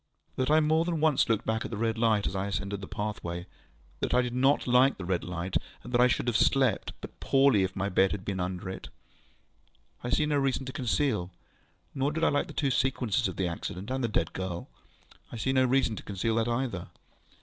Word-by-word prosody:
That 130 +1 0
I 155 +1 +5
more 160 +1 +3
than 170 -2 -1
once 150 -5 +3
looked 115 -2 +1
back 110 0 0
at - - -5
the 110 - -5
red 115 0 0
light 110 -3 +2
as 95 - -2
I 95 +1 -1
ascended 100 0 -3
the 95 - -7
pathway, 90 -5 -4 0.5
that - - 0
I 125 - +4
did 120 -1 -3
not 135 +3 +3
like 125 +2 +4
the 90 - -6
red 90 -1 -1
light, 90 +1 -2 0.3
and 120 - -9
that 120 - +4
I 125 - +7
should 120 - 0
have 120 - +1
slept 130 -1 +2
but - - -10
poorly 135 -6 +4
if 95 0 -1
my 100 +1 -1
bed 95 0 +3
had 95 -2 -5
been 95 -2 -2
under 90 0 -3
it, 95 - -6 1.1
I 120 - -3
see 150 - +2
no 150 -1 +1
reason 135 -1 0
to 130 - -6
conceal. 125 -7 0 0.6
Nor 140 +1 0
did 160 +1 -2
I - - +5
like 145 - 0
the - - -9
two 140 -3 0
sequences 125 -7 +1
of 95 - -5
the 95 - 0
accident 90 +5 -5
and 130 0 -1
the - - +2
dead 85 -7 -1
girl. 90 -2 -4 0.6
I - - -6
see 130 +4 0
no 130 -1 +4
reason 130 -3 +2
to - - -6
conceal 100 +3 -2
that 115 0 +1
either. 120 -7 -2
115 Hz, 230 wpm, -29 LUFS, 95-135 Hz, 1.1 s, I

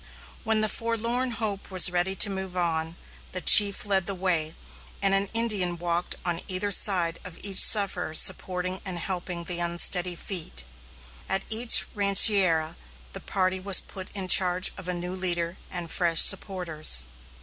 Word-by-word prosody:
When 220 -1 -2
the 215 - +3
Forlorn 230 +3 -3
Hope 215 -4 -6
was 185 -1 +3
ready 180 +2 -3
to 205 - +3
move 190 -1 -8
on, 165 -1 -4 0.4
the 185 - -5
chief 200 +3 +5
led 195 -3 -2
the 200 - -5
way, 170 -4 -3 0.4
and 195 -1 0
an 195 +1 -1
Indian 210 -7 -1
walked 175 +1 -4
on 175 -1 -3
either 190 +2 -5
side 175 -5 +1
of 180 -2 -13
each 195 -2 +2
sufferer 190 -6 +3
supporting 185 +2 +1
and 185 -3 -6
helping 175 -1 -6
the 175 0 -5
unsteady 175 +1 +1
feet. 165 - -7 0.7
At 190 0 -2
each 230 +2 +5
rancheria 195 -5 +3 0.4
the - - -7
party 185 -1 -4
was 190 -1 +1
put 190 -1 -10
in 190 -2 -5
charge 180 0 +4
of 185 -2 -12
a 180 - -4
new 180 +1 -7
leader 175 -2 -4
and 175 -2 -8
fresh 170 -3 +2
supporters. 160 - +3
185 Hz, 160 wpm, -23 LUFS, 175-200 Hz, 0.7 s, chief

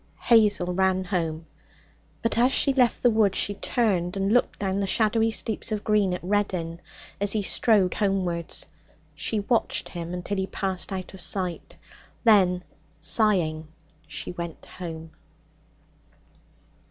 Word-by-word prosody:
Hazel 205 -6 +3
ran 190 0 +2
home. 165 -4 -2 0.8
But 230 - 0
as 245 +3 +4
she 275 - +3
left 250 -3 +2
the 245 - +5
wood 210 -3 +3
she 205 - 0
turned 195 -5 0
and 195 +2 +1
looked 245 - +2
down 195 -1 -1
the 200 - -1
shadowy 225 +2 +2
steeps 220 0 -1
of 210 -1 -2
green 210 -3 +2
at 180 - -8
Reddin 180 -4 -1 0.4
as 200 0 +1
he 215 -2 0
strode 195 -2 +3
homewards. 185 -5 -1 0.5
She 170 +7 -2
watched 230 +3 0
him 170 -1 -6
until 180 +3 -4
he 190 0 -1
passed 190 -1 -3
out 185 -1 -5
of 190 - -7
sight; 180 -4 -2 0.5
then, 185 -6 +4 0.4
sighing, 160 -2 +1 0.4
she 155 0 -5
went 170 -2 -7
home. 165 -3 -8
190 Hz, 140 wpm, -25 LUFS, 175-215 Hz, 0.8 s, the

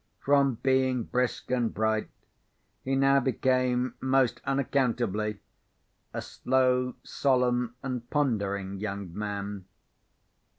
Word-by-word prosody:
From 140 -2 +4
being 130 -2 +2
brisk 125 +1 -2
and 120 -3 +1
bright, 110 0 0 0.7
he 135 +1 0
now 135 +1 +4
became, 130 -1 +1
most 130 -2 +2
unaccountably, 120 -6 0 0.7
a - - -4
slow, 125 -1 +1
solemn, 125 -3 +1
and 125 -3 -4
pondering 100 -9 -1
young 100 -4 -5
man. 100 -2 -4
125 Hz, 95 wpm, -28 LUFS, 110-130 Hz, 0.7 s, From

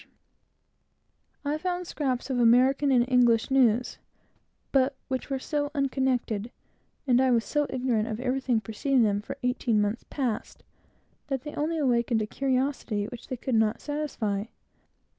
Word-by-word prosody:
In - - -29
these - - -36
papers, - - -46
too, - - -1
I 300 - 0
found 360 +1 -2
scraps 260 -5 -2
of 250 - 0
American 255 +4 +4
and 245 -2 +4
English 240 -2 +3
news; 250 -3 +2 0.7
but 270 0 +2
which 260 +1 -3
were 270 - -1
so 290 +2 -2
unconnected, 260 -5 0 0.6
and 250 -2 +4
I 260 - +3
was 235 -2 +2
so 295 -1 0
ignorant 245 -4 0
of 220 -2 -4
everything 255 -2 0
preceding 235 +5 +1
them 205 -1 +1
for 275 +6 -7
eighteen 250 -3 +1
months 205 +2 -1
past, 250 -7 -3 0.6
that 270 -3 -2
they 295 - -7
only 315 +3 -1
awakened 235 -5 +1
a - - -2
curiosity 260 -4 -1
which 245 - -10
they 255 - -4
could 255 +2 -3
not 220 -1 +2
satisfy. 250 -9 -2
255 Hz, 160 wpm, -27 LUFS, 230-275 Hz, 0.7 s, American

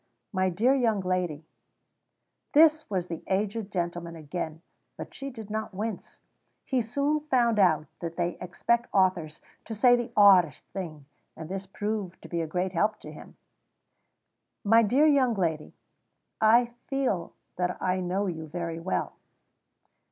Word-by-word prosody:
"My 185 0 +2
dear 220 +9 +2
young 230 -7 +1
lady 180 -4 -2 0.5
" - - -51
This 315 0 +5
was 185 -4 -1
the 170 -2 -6
aged 205 +2 -1
gentleman 175 -2 -3
again, 160 +1 -6 0.3
but - - -8
she 275 0 -6
did 220 -5 -9
not 215 -2 -4
wince; 210 0 -5 0.4
he 260 -2 +1
soon 280 +7 0
found 235 -5 +2
out 155 -6 +4
that 165 -1 -5
they 175 0 -1
expect 235 +6 -1
authors 180 -5 +1 0.2
to 225 - -6
say 245 +3 +6
the 240 0 -3
oddest 185 -8 +6
things, 160 -7 -7 0.3
and 160 0 -8
this 195 0 -5
proved 205 -2 -4
to - - -9
be 170 -1 -1
a 165 - -3
great 180 +4 -1
help 210 +4 0
to - - -9
him. - - -13 1.3
"My 225 +3 +6
dear 250 +8 +3
young 270 -6 +4
lady, 160 -5 -1 0.7
I 235 +2 +5
feel 255 -11 -1 0.2
that 180 0 -1
I 185 0 0
know 185 +3 -1
you 160 -4 -4
very 165 +1 -4
well." 180 +3 -2
190 Hz, 150 wpm, -27 LUFS, 175-230 Hz, 1.3 s, say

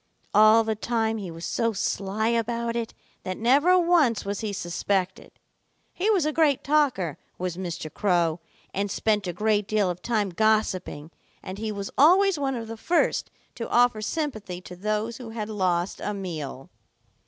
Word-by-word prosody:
All 215 +1 +7
the 220 0 -1
time 225 0 -1
he 195 -3 -6
was 165 0 -7
so 230 -1 0
sly 200 +2 -1
about 235 0 -1
it 235 -1 -3 0.3
that 185 0 -5
never 285 +11 +4
once 335 - +3
was 200 0 -3
he 215 -2 -3
suspected. 190 +1 -2 0.6
He 390 +5 0
was 385 -8 +3
a 305 - 0
great 300 -4 +2
talker, 275 - +1 0.2
was 180 -1 -3
Mr. 175 -4 -5
Crow, 175 -4 +1 0.3
and 200 +1 -1
spent 210 -1 0
a - - -1
great 210 +2 0
deal 210 -4 +1
of 175 0 -8
time 210 -4 0
gossiping, 185 -6 0 0.3
and 190 +2 -7
he 220 0 -3
was 200 -1 -5
always 365 +3 +5
one 270 -2 -1
of 230 -2 -5
the 225 0 -7
first 340 +9 +1 0.2
to 230 - -6
offer 240 -2 +3
sympathy 215 - -3
to 180 - -10
those 215 +4 -2
who 245 -3 -8
had 220 -1 -5
lost 185 -3 -1
a 210 - -2
meal. 155 -8 -6
215 Hz, 170 wpm, -25 LUFS, 185-235 Hz, 0.6 s, All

